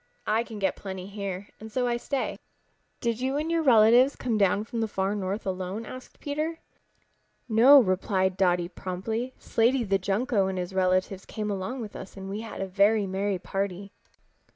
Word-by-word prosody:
I 220 +2 +2
can 225 -2 -9
get 195 -2 0
plenty 190 -2 -7
here 200 -1 -5
and 220 0 -9
so 250 +2 0
I 240 -1 +1
stay." 270 +3 -3 0.6
"Did 235 0 -1
you 265 +2 0
and 310 +3 -1
your 335 -1 +2
relatives 245 0 +6
come 240 -3 -1
down 200 0 +3
from 230 +1 -4
the 225 - +1
Far 195 -1 -1
North 200 0 -3
alone?" 190 +3 -3
asked 255 +3 -10
Peter. 305 +3 -2 0.9
"No," 250 +5 +8
replied 190 -3 +1
Dotty 180 -2 +2
promptly. 220 +8 -4
"Slaty 240 +3 +2
the 195 0 +2
Junco 200 +2 +1
and 190 -1 -3
his 180 +1 -4
relatives 185 +1 +1
came 210 -1 -3
along 200 +7 -3
with 215 -2 -7
us 190 - -9
and 195 0 -6
we 210 +2 -4
had 225 - -7
a 195 - -2
very 200 +3 +3
merry 195 +1 -1
party." 195 +1 -4
205 Hz, 180 wpm, -27 LUFS, 190-235 Hz, 0.9 s, No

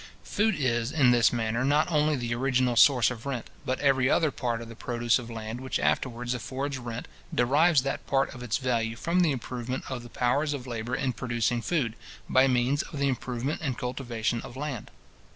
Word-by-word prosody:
Food 215 0 +1
is, 120 -3 0
in 140 -6 +4
this 120 -1 +5
manner, 115 +1 -1
not 150 +5 +2
only 150 -1 +3
the 120 -3 -2
original 130 0 +1
source 125 -1 +6
of 115 +1 -7
rent, 130 -4 -4 0.2
but 130 - 0
every 135 -2 +3
other 155 -3 +3
part 120 -3 -2
of 115 - -8
the 115 - -10
produce 120 +1 +1
of 120 -1 -8
land 115 +1 -6
which 130 - -2
afterwards 125 -1 0
affords 135 +3 -4
rent, 120 -1 -6 0.2
derives 145 +4 +4
that 135 - -3
part 135 0 +1
of 125 - -10
its 120 -2 -1
value 115 -4 -1
from 170 +9 0
the 170 -4 +4
improvement 125 0 -4
of 130 -2 -3
the 120 - -11
powers 140 +6 +1
of 135 -3 -5
labour 120 0 -3
in 130 -2 -1
producing 120 -1 -1
food, 130 -6 0 0.3
by 130 +1 +5
means 125 +2 +2
of 150 - -8
the 140 0 +1
improvement 130 +2 -3
and 135 -6 -2
cultivation 120 -2 -2
of 120 - -10
land. 140 -5 -4
125 Hz, 200 wpm, -28 LUFS, 120-140 Hz, 0.3 s, source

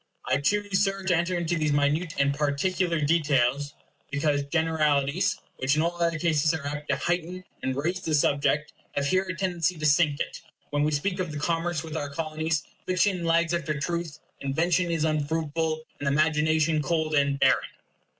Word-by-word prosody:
I 130 - +2
choose, 205 +4 +1
Sir, 195 -1 -1
to 185 -2 +2
enter 170 +2 0
into 170 0 -1
these 155 -1 +1
minute 145 +4 +1
and 140 0 +2
particular 165 +4 0
details, 145 -3 +1 0.3
because 145 0 +1
generalities, 155 0 +1 0.2
which 135 +3 +1
in 155 - +2
all 175 +1 -2
other 165 -1 +1
cases 155 -1 +2
are 150 -3 -6
apt 145 +1 -5
to - - +3
heighten 175 +1 -2 0.2
and 130 0 -1
raise 170 +7 -1
the 160 -4 -1
subject, 145 +1 +1 0.2
have 140 - -1
here 185 +6 +2
a 185 - -2
tendency 180 -2 0
to 155 - -3
sink 150 -1 +3
it. - - -4 0.3
When 145 0 +1
we 150 - +1
speak 180 +6 -1
of 180 -4 -2
the 150 - -5
commerce 165 +1 -1
with 160 -1 -7
our 145 -2 -3
Colonies, 155 +1 -2 0.2
fiction 185 -1 +1
lags 165 0 +2
after 155 -3 -1
truth, 170 0 -3 0.2
invention 170 +6 +1
is 165 -2 0
unfruitful, 155 +1 -1 0.2
and 145 - -3
imagination 155 +1 +2
cold 160 0 -1
and 140 -1 +2
barren. - - +3
155 Hz, 180 wpm, -26 LUFS, 145-170 Hz, 0.3 s, to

